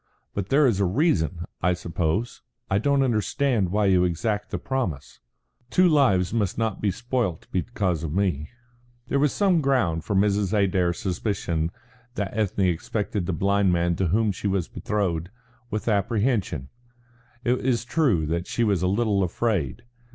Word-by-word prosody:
"But 100 -1 -3
there 145 +2 +4
is 115 -7 +2
a 100 - +3
reason, 90 - +1 0.2
I 90 +1 +3
suppose. 90 +6 -2 0.3
I 95 - +3
don't 140 +4 +2
understand 120 -2 +1
why 105 +1 +2
you 95 -2 +4
exact 105 +4 -1
the - - -3
promise." 80 - -3 0.5
"Two 185 +6 +4
lives 125 - +3
must 105 -5 0
not 110 -3 -1
be 105 - +2
spoilt 115 -5 -2
because 95 -4 -1
of 80 - -3
me." 85 -5 0 0.6
There 140 - +1
was 145 -1 +3
some 190 -5 +2
ground 100 - +1
for 100 - -2
Mrs. 100 0 +2
Adair's 95 -4 +2
suspicion 90 -4 -2 0.5
that 100 -1 -3
Ethne 100 -3 +1
expected 95 +2 -1
the 95 - 0
blind 100 +1 +2
man 85 0 +1
to 95 - +1
whom 105 +5 +2
she 100 +2 -4
was 95 -3 0
betrothed, 90 -5 -2 0.4
with 105 +1 -4
apprehension. 100 - 0 0.7
It 125 +1 +1
is 120 -3 +1
true 120 - +2
that 85 +3 -2
she 120 - 0
was 100 -6 +1
a 90 - +1
little 100 0 +1
afraid. 95 - -1
100 Hz, 160 wpm, -25 LUFS, 90-115 Hz, 0.7 s, there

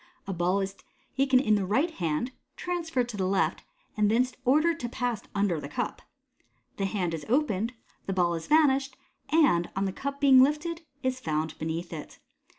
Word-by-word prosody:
A 195 - -3
ball 180 +3 +1
is 195 0 -3 0.4
taken 270 -1 +4
in 215 -5 +2
the 205 -2 +2
right 265 - +1
hand, 170 - -2 0.2
transferred 330 -8 -2
to 215 - -6
the 190 -1 0
left, 195 +1 +1 0.3
and 210 -2 +3
thence 250 +3 +2
ordered 310 +6 +3
to 240 - -3
pass 245 -3 -2
under 200 -5 +1
the 140 - -7
cup. - - -3 0.8
The 195 - 0
hand 190 -4 -1
is 160 -2 -4
opened, 235 -4 +1 0.3
the 195 - -1
ball 175 -2 +2
has 165 -1 -5
vanished, 280 -3 +3 0.3
and, 280 - +3
on 195 +1 0
the 190 - -2
cup 280 +4 -4
being 270 -2 +7
lifted, 300 +5 +1 0.2
is 255 0 -1
found 155 -4 -2
beneath 165 +2 -4
it. 155 -2 -8
220 Hz, 180 wpm, -28 LUFS, 185-275 Hz, 0.8 s, being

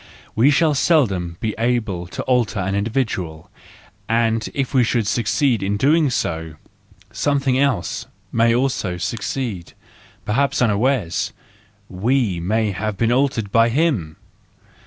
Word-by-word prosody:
We 120 +6 +5
shall 155 +1 +3
seldom 100 - +1
be 110 -1 -1
able 115 -7 -1
to - - -5
alter 125 -4 +1
an 95 +1 -1
individual, 100 -7 -2 0.6
and 115 -1 +1
if 135 -1 -2
we 130 -2 +4
should 115 -1 0
succeed 120 +3 +1
in 100 +1 -1
doing 150 +5 +3
so, 80 -9 -3 0.6
something 140 -3 +1
else 135 -10 0 0.2
may 115 0 +3
also 125 -8 -1
succeed, 110 -1 -4 0.5
perhaps 135 +6 +1
unawares: 110 -4 +1 0.5
we 105 0 0
may 105 +5 0
have 100 +2 -3
been 115 +2 +1
altered 125 -5 0
by 115 +2 +4
him 120 - 0
115 Hz, 125 wpm, -20 LUFS, 100-130 Hz, 0.6 s, We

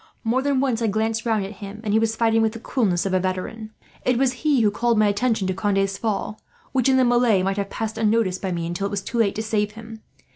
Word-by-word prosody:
More 235 +3 +1
than 280 -1 +1
once 255 -4 0
I 225 - +1
glanced 220 +2 -1
round 215 -3 +1
at 195 - -7
him, 200 +1 -7
and 210 -2 -1
he 220 - +4
was 225 0 0
fighting 225 0 +2
with 220 -1 +1
the 230 - -7
coolness 200 -8 0
of 195 - -1
a 185 - +3
veteran. 190 +4 -4 0.3
It 250 -1 +2
was 260 0 +2
he 295 -5 +3
who 210 -2 +3
called 235 +2 +1
my 215 - +4
attention 210 0 +1
to 185 - 0
Conde's 195 0 0
fall 215 -1 -3 0.3
which, 260 -1 +2
in 260 - +4
the 260 - +4
melee, 240 -5 +3
might 195 +1 -1
have 200 -1 -2
passed 220 +1 -4
unnoticed 215 -4 +1
by 190 - -2
me 170 -1 -2
until 175 +4 -2
it - - -5
was 200 -1 -3
too 235 - -3
late 205 -4 +2
to 220 - -2
save 210 -1 -1
him. 220 0 -10
220 Hz, 265 wpm, -23 LUFS, 200-230 Hz, 0.3 s, he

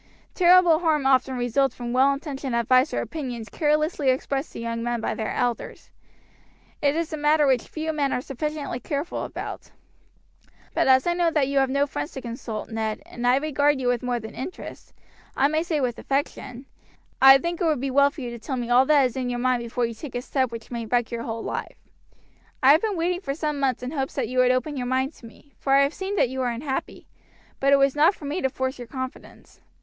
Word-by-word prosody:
Terrible 355 -2 +5
harm 310 -5 +1
often 260 -1 +3
results 245 +2 +1
from 240 0 -5
well 265 +2 +4
intentioned 275 -3 -4
advice 255 +4 +3
or - - -1
opinions 245 -8 -6
carelessly 305 - +1
expressed 270 +2 -1
to - - -7
young 230 0 -3
men 240 0 -1
by 225 - -2
their 220 - -3
elders; 245 -2 -3 0.9
it 285 0 +2
is 330 0 -2
a - - -2
matter 295 0 +3
which 260 -4 +2
few 315 0 -4
men 285 -3 0
are - - 0
sufficiently 285 0 -4
careful 285 +5 -3
about; - - -7 1.0
but - - +1
as 260 0 +5
I 345 - +2
know 345 -1 +2
that 300 -4 +1
you 280 0 +1
have 270 -1 +2
no 280 +2 +2
friends 290 +2 -5
to 265 - -6
consult, 230 -2 -6
Ned, 220 -1 -3
and 245 0 -4
as - - +6
I - - +4
regard 290 -1 +1
you 250 -1 0
with 245 -1 0
more 245 -1 -1
than 220 0 -9
interest, 335 +8 -8 0.5
I 275 - +4
may 310 +2 0
say 330 -3 -1
with 250 -4 -2
affection, 275 -2 -3 0.6
I 270 0 +10
think 340 +5 -4
it - - +2
would 310 -5 +1
be 270 +1 -2
well 280 +1 +5
for 285 - -10
you 245 -2 -5
to 235 - -8
tell 260 +3 -4
me 240 -1 -3
all 255 +2 +5
that 305 - +4
there 275 - +5
is 250 - -2
in 255 -2 -2
your 245 - -2
mind 250 0 +1
before 235 +1 -1
you 230 - -4
take 245 +3 -9
a 245 - -3
step 260 -3 0
which 230 0 -9
may 235 -2 -4
wreck 240 0 0
your 235 -1 -3
whole 230 -1 -5
life. - - -5 0.9
"I 265 - +8
have 310 +4 +5
been 425 -4 -1
waiting 350 +2 0
for 275 -6 -3
some 300 -2 -2
months 265 -2 0
in 250 - -4
hopes 270 -3 -3
that - - -1
you 255 0 -1
would 255 0 +5
open 255 +3 0
your 250 -1 -3
mind 260 +3 0
to 235 - -12
me, 280 +5 -19
for 270 - 0
I 280 - +6
have 280 +3 0
seen 390 +1 -4
that 260 - +2
you 260 +1 -5
were 255 -1 0
unhappy; 265 +3 -4 0.5
but 275 +1 +2
it - - +8
was 275 0 +3
not 310 +6 +4
for 295 - -11
me 300 +6 -2
to 265 - +1
force 260 0 -3
your 245 - -7
confidence." 260 +1 -8
270 Hz, 240 wpm, -24 LUFS, 245-295 Hz, 1.0 s, I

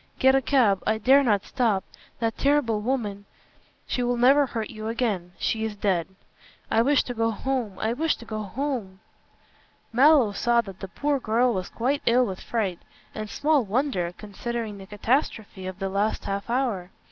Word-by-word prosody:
Get 265 0 +5
a 270 - +4
cab. 235 -9 +3
I 220 0 +2
dare 265 +6 +5
not 210 -7 +1
stop. 225 -7 +1 0.3
That 225 -1 -1
terrible 275 -7 +2
woman 210 -5 -2 0.3
" - - -35
"She 250 - -2
will 245 0 0
never 275 +4 +5
hurt 225 -3 -4
you 215 0 -6
again. 215 -7 -2
She 220 -1 -1
is 220 -1 -3
dead." 190 -5 0 0.6
"I 225 - +4
wish 280 +4 +3
to 245 - -5
go 225 -1 +1
home 230 -3 -2
I 220 +3 -1
wish 315 +5 +1
to 235 - -13
go 215 -1 -4
home." 220 -3 -4 0.9
Mallow 265 -3 +6
saw 235 +4 +2
that 195 -4 -11
the 195 - -6
poor 285 +8 -1
girl 240 +1 +2
was 185 -2 -3
quite 270 +5 -1
ill 245 +2 +5
with 190 -4 -5
fright; 200 -7 -2 0.3
and 215 -1 -5
small 295 +1 +2
wonder, 210 -5 -1
considering 215 0 -5
the 190 - -11
catastrophe 210 -3 -1
of 185 -1 -6
the 195 0 -2
last 200 +3 -1
half 200 +2 -3
hour. 235 -8 -1
225 Hz, 180 wpm, -25 LUFS, 200-255 Hz, 0.9 s, Mallow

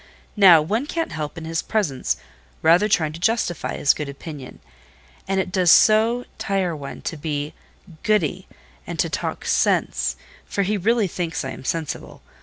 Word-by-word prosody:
Now, 180 -7 +7
one 220 - -1
can't 330 +1 -2
help, 155 -1 -5
in 160 - -6
his 165 0 -1
presence, 135 - -1 0.5
rather 175 +6 +5
trying 160 -7 +2
to 165 - -8
justify 195 -3 0
his 145 - +4
good 150 -2 -5
opinion; 140 -1 -9 0.7
and 195 0 0
it 185 - -2
does 180 -2 +2
so 225 +6 +5
tire 190 -4 -1
one 140 -2 -8
to 165 - -4
be 150 -1 -3 0.5
goody, 210 -8 0 0.4
and - - -5
to - - 0
talk - - -3
sense,—for 65 - -1
he 205 +3 0
really 215 +2 +2
thinks 165 -4 -3
I 130 - -4
am - - -9
sensible. 160 +2 -4
170 Hz, 160 wpm, -22 LUFS, 150-210 Hz, 0.7 s, Now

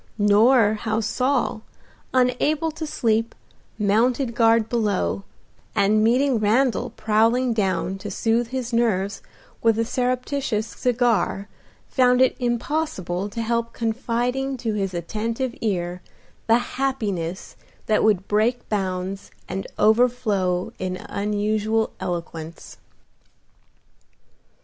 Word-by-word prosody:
Nor 210 +2 +5
how 220 0 -1
Saul, 250 +1 0 0.5
unable 260 +5 +1
to 315 0 -6
sleep, 225 -4 0 0.4
mounted 230 +5 +1
guard 225 -1 +4
below, 210 -4 -1 0.5
and 215 +1 +3
meeting 250 +2 +3
Randal 240 +4 +2
prowling 230 +3 +2
down 195 -2 -1
to 205 +2 -6
soothe 225 +4 0
his 250 -1 -4
nerves 205 -4 +1 0.4
with 225 -1 +3
a 230 - +1
surreptitious 250 -2 -1
cigar 230 -5 0 0.4
found 250 -1 +3
it 260 0 +4
impossible 240 - -2
to 230 +3 -4
help 235 0 -1
confiding 245 +4 -1
to 230 -3 -2
his 195 -3 -2
attentive 225 +8 -3
ear 180 -4 -2 0.5
the 225 +1 +6
happiness 215 -9 -3 0.3
that 215 - +2
would 200 -3 +2
break 225 +4 +1
bounds 190 -1 -3 0.2
and 195 +1 -4
overflow 210 -5 +2
in 185 0 -3
unusual 210 +2 0
eloquence. 170 -2 -6
225 Hz, 105 wpm, -23 LUFS, 205-245 Hz, 0.5 s, the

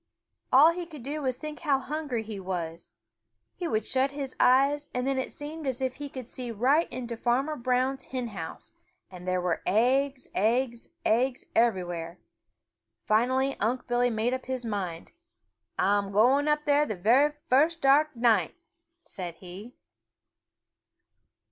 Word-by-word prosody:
All 290 +6 +8
he 345 0 -5
could 300 -7 -11
do 295 +4 -4
was 260 -3 -1
to - - -15
think 305 -1 -6
how 290 -5 +2
hungry 280 -4 -3
he 215 -2 -7
was. 175 -3 -5 0.6
He 350 - -4
would 215 -4 -1
shut 265 +1 +1
his 275 -1 -5
eyes, 280 +3 +4
and 250 0 -1
then 270 -1 0
it 260 - -3
seemed 300 +1 -7
as 260 -2 -2
if 260 -1 -2
he 290 -1 -6
could 260 -2 -7
see 250 -1 -6
right 260 +9 +2
into 240 -2 -5
Farmer 255 +6 0
Brown's 255 +1 0
hen 250 -2 -4
house, 170 -6 -8 0.4
and 180 0 -10
there 185 0 +1
were 175 -2 -1
eggs, 260 +5 +1
eggs, 235 +3 0 0.2
eggs, 245 +3 +1
everywhere. 175 -7 0 0.9
Finally 260 +5 +2
Unc' 240 +5 -1
Billy 245 0 +2
made 230 +2 0
up 260 -1 -4
his 260 -2 -3
mind. 190 -6 -4 0.7
"Ah'm 200 0 +1
going 255 +8 +4
up 300 0 +1
there 295 0 +3
the 215 - -3
very 255 +11 +4
first 310 +6 +3
dark 295 0 +4
night!" 230 - +2 0.5
said 175 -3 -7
he. 190 +8 -11
250 Hz, 155 wpm, -28 LUFS, 215-275 Hz, 0.9 s, All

